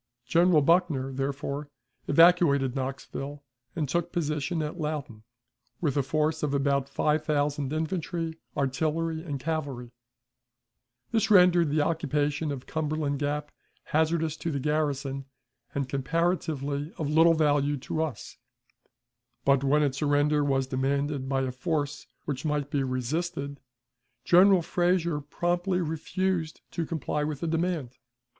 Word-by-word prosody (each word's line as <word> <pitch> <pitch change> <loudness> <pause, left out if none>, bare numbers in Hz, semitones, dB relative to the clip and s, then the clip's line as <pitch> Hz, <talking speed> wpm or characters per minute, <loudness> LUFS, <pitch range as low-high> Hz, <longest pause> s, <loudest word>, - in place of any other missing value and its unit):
General 165 +2 +4
Buckner, 160 -5 +2
therefore, 140 +2 -3 0.4
evacuated 145 -5 +5
Knoxville, 135 +2 -5 0.3
and 155 -4 -1
took 170 +4 -1
position 155 -1 -1
at 150 +4 -5
Loudon, 150 -8 -4 0.6
with 150 -6 0
a 140 - +3
force 155 +3 0
of 145 -2 0
about 140 -1 +1
five 150 0 +1
thousand 145 -2 0
infantry, 160 0 -2 0.2
artillery, 160 +4 0
and 145 -5 -4
cavalry; 140 -6 -3 1.2
this 225 -2 +1
rendered 180 -5 +6
the 150 +1 +2
occupation 150 -1 0
of 135 -2 -6
Cumberland 155 -2 -2
Gap 150 0 -2 0.3
hazardous 160 0 +1
to 165 - -3
the 140 -3 -1
garrison, 140 -2 -1 0.5
and 140 -2 -1
comparatively 145 0 -1
of 155 - -2
little 165 +2 +5
value 145 -2 +2
to 160 +3 -2
us, 155 -9 -5 1.1
but, 140 -1 +4
when 150 +2 +3
its 140 -1 0
surrender 145 0 +2
was 135 -2 +1
demanded 135 +1 -1
by 135 -1 +1
a 130 - -2
force 145 +2 -2 0.2
which 140 -2 -3
might 150 -2 -1
be 140 - +1
resisted, 140 +3 -2 0.7
General 185 0 +6
Frazier 175 -2 +1
promptly 175 +5 -1
refused 165 +1 -2
to 165 -2 -3
comply 150 -2 -2
with 150 -2 -3
the 170 - -1
demand. 165 -6 -2
150 Hz, 130 wpm, -28 LUFS, 140-165 Hz, 1.2 s, rendered